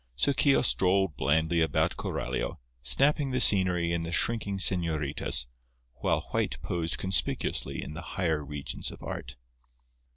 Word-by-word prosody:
So 140 Hz, -, +3 dB
Keogh 140 Hz, +1 st, +3 dB
strolled 95 Hz, -, +2 dB
blandly 80 Hz, +5 st, +1 dB
about 80 Hz, -, +1 dB
Coralio, 60 Hz, +1 st, -4 dB, 0.2 s
snapping 140 Hz, -, +3 dB
the 130 Hz, 0 st, -1 dB
scenery 90 Hz, -6 st, +4 dB
and 85 Hz, -1 st, -1 dB
the 85 Hz, -, -5 dB
shrinking 100 Hz, +1 st, 0 dB
señoritas, 80 Hz, -9 st, +1 dB, 0.5 s
while -, -, 0 dB
White -, -, -1 dB
posed 85 Hz, -2 st, -2 dB
conspicuously 95 Hz, -1 st, -1 dB
in 75 Hz, -, -8 dB
the 85 Hz, -, -7 dB, 0.2 s
higher 80 Hz, -5 st, 0 dB
regions 70 Hz, -1 st, -4 dB
of -, -, -12 dB
art. 65 Hz, +1 st, -6 dB
85 Hz, 135 wpm, -28 LUFS, 75-95 Hz, 0.5 s, scenery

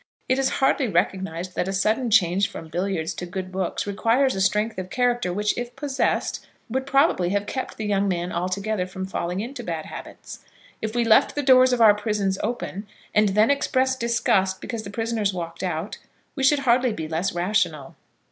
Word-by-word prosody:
It 260 Hz, +1 st, +2 dB
is 270 Hz, -, +2 dB
hardly 270 Hz, -1 st, +2 dB
recognised 185 Hz, -2 st, -1 dB
that 180 Hz, -, -1 dB
a -, -, -1 dB
sudden 215 Hz, +6 st, +1 dB
change 195 Hz, -2 st, +3 dB
from 160 Hz, -, -9 dB
billiards 175 Hz, -1 st, -2 dB
to 180 Hz, -, -6 dB
good 185 Hz, +1 st, -5 dB
books 185 Hz, -1 st, -2 dB
requires 230 Hz, +6 st, +2 dB
a 190 Hz, -, -2 dB
strength 210 Hz, +2 st, +1 dB
of 185 Hz, 0 st, -6 dB
character 245 Hz, -5 st, 0 dB
which, 210 Hz, +3 st, 0 dB
if 245 Hz, 0 st, -5 dB
possessed, 275 Hz, -1 st, -1 dB, 0.3 s
would 265 Hz, +2 st, -2 dB
probably 275 Hz, -, +3 dB
have 205 Hz, +1 st, 0 dB
kept 260 Hz, +5 st, -5 dB
the 220 Hz, -, -4 dB
young 200 Hz, -1 st, +1 dB
man 175 Hz, -1 st, -2 dB
altogether 185 Hz, +2 st, -2 dB
from 190 Hz, 0 st, -6 dB
falling 180 Hz, 0 st, -3 dB
into 245 Hz, +2 st, -6 dB
bad 165 Hz, -5 st, -4 dB
habits. -, -, -9 dB, 0.4 s
If 220 Hz, +1 st, -3 dB
we 240 Hz, -, +2 dB
left 220 Hz, -2 st, +4 dB
the 290 Hz, -, -1 dB
doors 255 Hz, -1 st, +6 dB
of 250 Hz, -1 st, +1 dB
our 215 Hz, -2 st, +8 dB
prisons 205 Hz, -2 st, -1 dB
open, 215 Hz, -4 st, -4 dB, 0.3 s
and 210 Hz, -1 st, +4 dB
then 210 Hz, +6 st, +4 dB
expressed 260 Hz, -2 st, +1 dB
disgust 230 Hz, -5 st, +1 dB
because 230 Hz, -3 st, -5 dB
the 200 Hz, -, -8 dB
prisoners 220 Hz, -2 st, -1 dB
walked 170 Hz, -2 st, -5 dB
out, 175 Hz, +2 st, -3 dB, 0.4 s
we 275 Hz, -, -4 dB
should 280 Hz, +1 st, +4 dB
hardly 245 Hz, -1 st, +3 dB
be 160 Hz, -5 st, -5 dB
less 165 Hz, +4 st, -1 dB
rational. 175 Hz, -6 st, -1 dB
205 Hz, 190 wpm, -24 LUFS, 185-240 Hz, 0.4 s, our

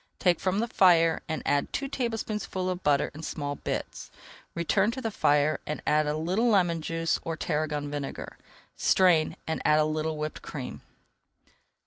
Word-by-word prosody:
Take 180 Hz, -3 st, +2 dB
from 190 Hz, 0 st, 0 dB
the 230 Hz, +3 st, 0 dB
fire 165 Hz, -6 st, +4 dB
and 160 Hz, -, -3 dB
add 145 Hz, 0 st, +1 dB
two 275 Hz, -, -2 dB
tablespoonfuls 215 Hz, -7 st, -2 dB
of 180 Hz, 0 st, -5 dB
butter 145 Hz, -3 st, +2 dB
in 155 Hz, -, -9 dB
small 145 Hz, -3 st, -4 dB
bits. -, -, -5 dB, 0.5 s
Return 170 Hz, +5 st, +2 dB
to 245 Hz, +3 st, -4 dB
the 225 Hz, -3 st, -3 dB
fire, 150 Hz, -4 st, +2 dB
and 150 Hz, -, -3 dB
add 150 Hz, 0 st, +2 dB
a 150 Hz, +1 st, -1 dB
little 185 Hz, +9 st, +1 dB
lemon 175 Hz, -6 st, +2 dB
juice 165 Hz, +1 st, -1 dB
or 165 Hz, -1 st, -4 dB
tarragon 150 Hz, -1 st, -2 dB
vinegar. 145 Hz, -2 st, -6 dB, 0.4 s
Strain, 175 Hz, -5 st, +3 dB
and 160 Hz, -, -2 dB
add 150 Hz, -, +4 dB
a 155 Hz, -, +4 dB
little 155 Hz, 0 st, -2 dB
whipped 155 Hz, 0 st, -4 dB
cream. -, -, -7 dB
165 Hz, 165 wpm, -28 LUFS, 150-185 Hz, 0.5 s, fire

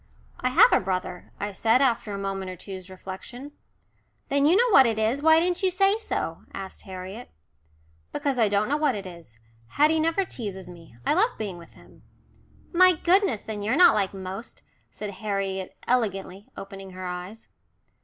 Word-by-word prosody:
"I 255 Hz, -, 0 dB
have 410 Hz, -, +6 dB
a -, -, +5 dB
brother," 185 Hz, -1 st, -4 dB
I 205 Hz, +1 st, -3 dB
said 225 Hz, +5 st, +2 dB
after 235 Hz, -5 st, +1 dB
a 200 Hz, -, -4 dB
moment 195 Hz, -1 st, -4 dB
or 185 Hz, -, -6 dB
two's 185 Hz, 0 st, -9 dB
reflection. 195 Hz, +9 st, -9 dB, 0.8 s
"Then 280 Hz, +1 st, +3 dB
you 335 Hz, -, +5 dB
know 480 Hz, +3 st, +4 dB
what 270 Hz, -9 st, +7 dB
it 225 Hz, -2 st, -1 dB
is. 220 Hz, +6 st, 0 dB
Why 320 Hz, +1 st, +6 dB
didn't 355 Hz, +2 st, 0 dB
you 380 Hz, -, +3 dB
say 390 Hz, +4 st, +2 dB
so?" 445 Hz, -, -4 dB
asked 195 Hz, -1 st, -7 dB
Harriet. 190 Hz, +5 st, -8 dB, 0.8 s
"Because 275 Hz, -3 st, -2 dB
I 220 Hz, -3 st, +4 dB
don't 205 Hz, +1 st, +1 dB
know 290 Hz, +3 st, +1 dB
what 300 Hz, -5 st, +1 dB
it 200 Hz, -1 st, -6 dB
is. 170 Hz, -10 st, -12 dB, 0.3 s
Haddie 305 Hz, -, +3 dB
never 330 Hz, +5 st, +1 dB
teases 200 Hz, -, -7 dB
me. 165 Hz, -8 st, -14 dB
I -, -, +3 dB
love 435 Hz, +9 st, +2 dB
being 195 Hz, -5 st, -5 dB
with 170 Hz, -, -15 dB
him." -, -, -19 dB, 0.7 s
"My 365 Hz, +1 st, +7 dB
goodness! 350 Hz, -, +2 dB
Then 215 Hz, -2 st, -6 dB
you're 220 Hz, +5 st, 0 dB
not 350 Hz, +2 st, +7 dB
like 195 Hz, -2 st, 0 dB
most," 195 Hz, +4 st, -8 dB, 0.3 s
said 210 Hz, -1 st, -7 dB
Harriet 195 Hz, -1 st, -4 dB
elegantly, 200 Hz, -5 st, -1 dB
opening 195 Hz, -1 st, -9 dB
her 185 Hz, 0 st, -7 dB
eyes. 180 Hz, +5 st, -7 dB
210 Hz, 180 wpm, -25 LUFS, 190-295 Hz, 0.8 s, what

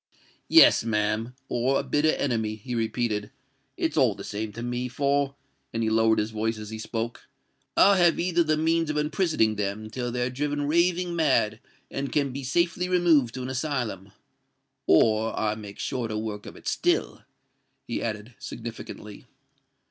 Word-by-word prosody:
"Yes, -, -, +7 dB
ma'am—or 115 Hz, +4 st, -1 dB
a -, -, -2 dB
bitter 150 Hz, +3 st, +2 dB
enemy," 110 Hz, -5 st, -1 dB
he 115 Hz, +4 st, -7 dB
repeated;—"it's 110 Hz, -2 st, -3 dB
all -, -, +4 dB
the -, -, -8 dB
same 105 Hz, +1 st, -4 dB
to 115 Hz, -, -6 dB
me; 120 Hz, +1 st, -2 dB
for,"—and 140 Hz, -3 st, -2 dB
he 110 Hz, -, +1 dB
lowered 110 Hz, 0 st, +4 dB
his 105 Hz, +1 st, -1 dB
voice 110 Hz, +1 st, -1 dB
as 105 Hz, 0 st, -8 dB
he 110 Hz, -, -6 dB
spoke—"I 120 Hz, -, -1 dB
have 175 Hz, -2 st, +4 dB
either 175 Hz, 0 st, +2 dB
the 155 Hz, -1 st, +1 dB
means 165 Hz, 0 st, +1 dB
of 150 Hz, -, -1 dB
imprisoning 150 Hz, -, +1 dB
them 105 Hz, +2 st, -3 dB
till 120 Hz, 0 st, -3 dB
they're 125 Hz, +1 st, -1 dB
driven 145 Hz, +2 st, -2 dB
raving 170 Hz, +3 st, +1 dB
mad 130 Hz, -9 st, +2 dB, 0.3 s
and 140 Hz, 0 st, -3 dB
can 140 Hz, -3 st, +1 dB
be 140 Hz, +1 st, -5 dB
safely 170 Hz, +6 st, 0 dB
removed 165 Hz, -9 st, +3 dB
to 130 Hz, -, -4 dB
an 130 Hz, -, -4 dB
asylum—or 110 Hz, -, -1 dB
I 105 Hz, -1 st, +1 dB
make 105 Hz, -2 st, -9 dB
shorter 115 Hz, -4 st, -3 dB
work 105 Hz, -1 st, -5 dB
of -, -, -9 dB
it -, -, -12 dB
still!" -, -, 0 dB, 0.7 s
he -, -, -3 dB
added, 110 Hz, +1 st, -4 dB
significantly. 110 Hz, -2 st, -8 dB
120 Hz, 150 wpm, -26 LUFS, 110-145 Hz, 0.7 s, Yes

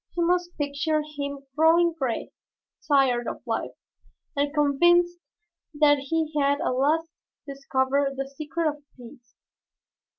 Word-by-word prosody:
You 340 Hz, -, +2 dB
must 355 Hz, 0 st, 0 dB
picture 300 Hz, +2 st, -1 dB
him 285 Hz, -2 st, -6 dB
growing 330 Hz, +2 st, +4 dB
gray, 265 Hz, -8 st, -3 dB, 0.6 s
tired 260 Hz, -5 st, +3 dB
of -, -, -6 dB
life -, -, -3 dB, 0.6 s
and 285 Hz, 0 st, 0 dB
convinced 345 Hz, +4 st, +3 dB, 0.6 s
that 290 Hz, -1 st, +4 dB
he 315 Hz, +3 st, -2 dB
had 285 Hz, 0 st, +2 dB
at 340 Hz, -, -1 dB
last 305 Hz, +6 st, +1 dB, 0.4 s
discovered 275 Hz, 0 st, -1 dB
the 270 Hz, 0 st, -4 dB
secret 305 Hz, +4 st, -3 dB
of 295 Hz, -1 st, -4 dB
peace. 240 Hz, -1 st, -15 dB
290 Hz, 125 wpm, -25 LUFS, 275-325 Hz, 0.6 s, growing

